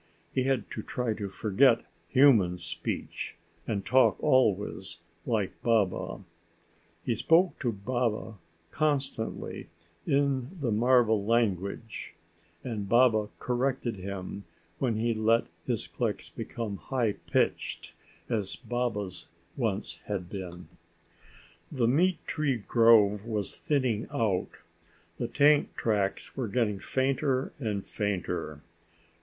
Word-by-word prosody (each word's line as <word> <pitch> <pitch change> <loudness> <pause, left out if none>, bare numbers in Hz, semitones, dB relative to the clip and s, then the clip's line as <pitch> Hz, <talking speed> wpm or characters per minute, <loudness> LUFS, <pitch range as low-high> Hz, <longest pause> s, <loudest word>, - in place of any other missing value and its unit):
He 130 - +1
had 130 -5 0
to - - -4
try 125 -3 -2
to 100 -2 -5
forget 115 +5 +3 0.3
human 115 -10 +5
speech, - - -4 0.3
and 100 -3 -2
talk 130 0 +4
always 105 -7 +1 0.3
like 110 -5 -1
Baba. 110 -5 +1 0.8
He 120 - +1
spoke 165 - +3
to 120 -4 0
Baba 110 0 -2 0.3
constantly 140 -7 -2 0.4
in 140 +3 +1
the 130 -6 0
marva 120 +1 +4
language, 105 0 -1 0.5
and 105 -5 -4
Baba 115 -3 +4
corrected 125 -2 -1
him 95 +1 -6 0.4
when 120 -4 +1
he 115 +2 +1
let 110 +1 +3 0.2
his - - -1
clicks - - -3
become 110 -4 -5
high 120 -3 0 0.2
pitched - - 0 0.3
as 105 -5 -1
Baba's 115 -6 -3 0.3
once 110 -5 -2
had 95 -4 -4
been. 90 -3 -7 1.0
The 125 -6 +1
meat 170 +8 +2
tree 145 -5 0
grove 105 -2 +5
was 105 -4 0
thinning 130 -8 0
out. 100 -5 0 0.7
The - - -1
tank 145 +1 +4
tracks 100 -3 -1
were 130 -3 -2
getting 105 -2 0
fainter 130 +2 0
and 105 -6 -2
fainter. 90 -7 -3
115 Hz, 110 wpm, -29 LUFS, 100-130 Hz, 1.0 s, human